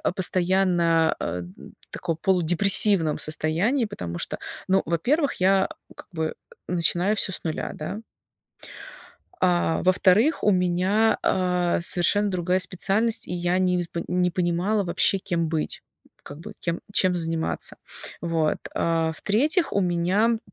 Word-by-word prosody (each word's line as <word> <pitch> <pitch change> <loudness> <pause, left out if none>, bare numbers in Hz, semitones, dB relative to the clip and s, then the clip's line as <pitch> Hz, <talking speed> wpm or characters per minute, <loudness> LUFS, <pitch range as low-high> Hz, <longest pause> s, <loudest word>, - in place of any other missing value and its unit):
постоянно, 175 -3 +2
а, 85 +1 -3
н 90 +2 -12 0.2
таком 165 -1 -4
полудепрессивном 180 -1 +4
состоянии, 175 - +1
потому 85 - -7
что, - - -4 0.3
ну, 190 +1 +2
во-первых, 270 - 0
я, 190 +1 +2 0.3
как - - -13
бы, 160 -2 -3 0.3
начинаю 180 +4 +1
всё 195 - -1
с - - -3
нуля, 160 -2 -4
да. 175 +7 -6 1.4
А 175 -2 +1
во-вторых, 185 - +3
у 210 - +4
меня, 185 +4 +1
а, 180 -2 0
совершенно 195 +4 +2
другая 180 0 0
специальность, 195 +5 0
и 180 - -4
я 175 +1 0
не 180 -1 +1
вз 175 - -3 0.2
не 180 0 0
понимала 180 +4 -1
вообще, 185 +2 +1
кем 170 -4 -2
быть, 160 -1 -3 0.4
как 145 +2 -11
бы - - -10
кем 170 -1 -3
чем 185 -2 +2
заниматься. 165 -1 -3 0.5
Вот, 165 -2 -1 0.2
а 165 -1 0
в-третьих, 295 - +1
у 200 - +2
меня, 185 +6 +1
180 Hz, 130 wpm, -24 LUFS, 165-195 Hz, 1.4 s, полудепрессивном